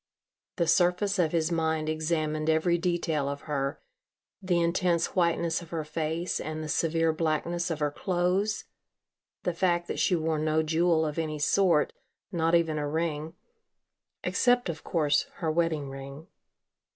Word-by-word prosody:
The 170 Hz, -, +1 dB
surface 180 Hz, +4 st, +2 dB
of 165 Hz, -3 st, +2 dB
his 165 Hz, 0 st, +1 dB
mind 160 Hz, -2 st, 0 dB
examined 155 Hz, -1 st, -1 dB
every 160 Hz, +2 st, +3 dB
detail 165 Hz, -5 st, 0 dB
of 140 Hz, 0 st, -5 dB
her 140 Hz, -2 st, -2 dB, 0.6 s
the 180 Hz, -2 st, +1 dB
intense 170 Hz, 0 st, +1 dB
whiteness 170 Hz, -1 st, +1 dB
of 170 Hz, -, -12 dB
her 165 Hz, -2 st, -3 dB
face 160 Hz, +3 st, -2 dB
and 155 Hz, 0 st, -4 dB
the -, -, -5 dB
severe 165 Hz, 0 st, +1 dB
blackness 165 Hz, +2 st, -1 dB
of 165 Hz, -, -2 dB
her 145 Hz, -1 st, +1 dB
clothes, 185 Hz, +5 st, 0 dB, 0.8 s
the 180 Hz, -, 0 dB
fact 175 Hz, 0 st, +1 dB
that -, -, -3 dB
she 180 Hz, -, +3 dB
wore 160 Hz, -1 st, 0 dB
no 155 Hz, +1 st, +1 dB
jewel 160 Hz, 0 st, +2 dB
of 150 Hz, +1 st, -3 dB
any 155 Hz, -2 st, -2 dB
sort, 165 Hz, +1 st, +3 dB, 0.4 s
not 165 Hz, -2 st, +2 dB
even 160 Hz, -2 st, +2 dB
a 145 Hz, -, -2 dB
ring 160 Hz, 0 st, -2 dB, 0.9 s
except, 245 Hz, -4 st, +2 dB
of 160 Hz, -1 st, -5 dB
course, 150 Hz, -3 st, +1 dB
her 160 Hz, -2 st, -1 dB
wedding 160 Hz, -3 st, 0 dB
ring. 135 Hz, +3 st, -8 dB
165 Hz, 150 wpm, -28 LUFS, 155-175 Hz, 0.9 s, every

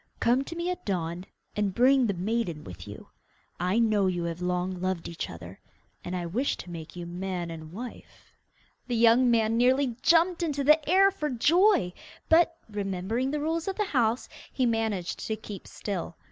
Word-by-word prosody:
Come 250 Hz, +3 st, +3 dB
to 335 Hz, -, -7 dB
me 345 Hz, +1 st, -1 dB
at 360 Hz, -, -6 dB
dawn 175 Hz, -2 st, -3 dB, 0.3 s
and 205 Hz, -3 st, -1 dB
bring 260 Hz, 0 st, +5 dB
the 200 Hz, -, -1 dB
maiden 185 Hz, -4 st, -2 dB
with 90 Hz, 0 st, -10 dB
you. 105 Hz, -, -10 dB, 0.5 s
I 180 Hz, +4 st, +1 dB
know 215 Hz, -4 st, +3 dB
you 175 Hz, -2 st, -1 dB
have 170 Hz, +1 st, -4 dB
long 180 Hz, 0 st, -1 dB
loved 185 Hz, -2 st, -2 dB
each 170 Hz, -, -5 dB
other, 85 Hz, +3 st, -10 dB, 0.4 s
and 180 Hz, -, -4 dB
I 175 Hz, -1 st, -3 dB
wish 235 Hz, +12 st, -1 dB
to 175 Hz, -, -9 dB
make 165 Hz, -1 st, -8 dB
you 175 Hz, -1 st, -6 dB
man 175 Hz, 0 st, -4 dB
and 160 Hz, -1 st, -8 dB
wife.' 235 Hz, +7 st, -10 dB, 0.5 s
The 245 Hz, -, -1 dB
young 235 Hz, +2 st, +5 dB
man 225 Hz, -1 st, +2 dB
nearly 255 Hz, 0 st, +3 dB
jumped 340 Hz, +2 st, +4 dB
into 290 Hz, -4 st, -1 dB
the 300 Hz, +1 st, +4 dB
air 390 Hz, +2 st, +6 dB
for 305 Hz, -6 st, -3 dB
joy, 295 Hz, -, +3 dB, 0.4 s
but, 330 Hz, 0 st, +4 dB
remembering 205 Hz, +4 st, -2 dB
the 295 Hz, +1 st, -2 dB
rules 325 Hz, +3 st, -1 dB
of 385 Hz, -, -1 dB
the 420 Hz, -, 0 dB
house, 240 Hz, -, +1 dB, 0.2 s
he 260 Hz, -, 0 dB
managed 220 Hz, -6 st, -1 dB
to 220 Hz, -, -1 dB
keep 205 Hz, -3 st, -9 dB
still. 185 Hz, -4 st, -5 dB
220 Hz, 185 wpm, -28 LUFS, 180-270 Hz, 0.5 s, air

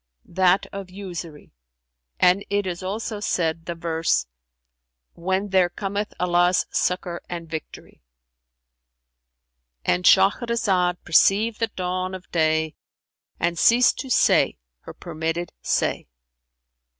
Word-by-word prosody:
"That 185 Hz, +1 st, +2 dB
of 195 Hz, -2 st, -7 dB
'Usury',[FN#375] 175 Hz, -5 st, -8 dB, 0.7 s
and 185 Hz, +2 st, +4 dB
it 205 Hz, 0 st, 0 dB
is 180 Hz, 0 st, -4 dB
also 210 Hz, +3 st, -4 dB
said, 165 Hz, -5 st, -1 dB
the 170 Hz, -, -3 dB
verse, 165 Hz, -1 st, 0 dB, 0.9 s
'When 190 Hz, +4 st, -2 dB
there 185 Hz, -2 st, +3 dB
cometh 200 Hz, +3 st, -4 dB
Allah's 175 Hz, 0 st, +2 dB
succour 180 Hz, -1 st, -1 dB
and 170 Hz, -1 st, -6 dB
victory.'"[FN#376]—And 60 Hz, -, -9 dB
Shahrazad 195 Hz, -2 st, +3 dB
perceived 210 Hz, +7 st, +3 dB
the 230 Hz, -, +1 dB
dawn 185 Hz, -1 st, -3 dB
of 185 Hz, -1 st, -12 dB
day 160 Hz, -1 st, +1 dB, 0.7 s
and 170 Hz, 0 st, -1 dB
ceased 245 Hz, +2 st, +4 dB
to 265 Hz, -, -5 dB
say -, -, +3 dB, 0.2 s
her -, -, -11 dB
permitted 165 Hz, 0 st, -4 dB
say. -, -, -1 dB
175 Hz, 105 wpm, -23 LUFS, 160-190 Hz, 0.9 s, and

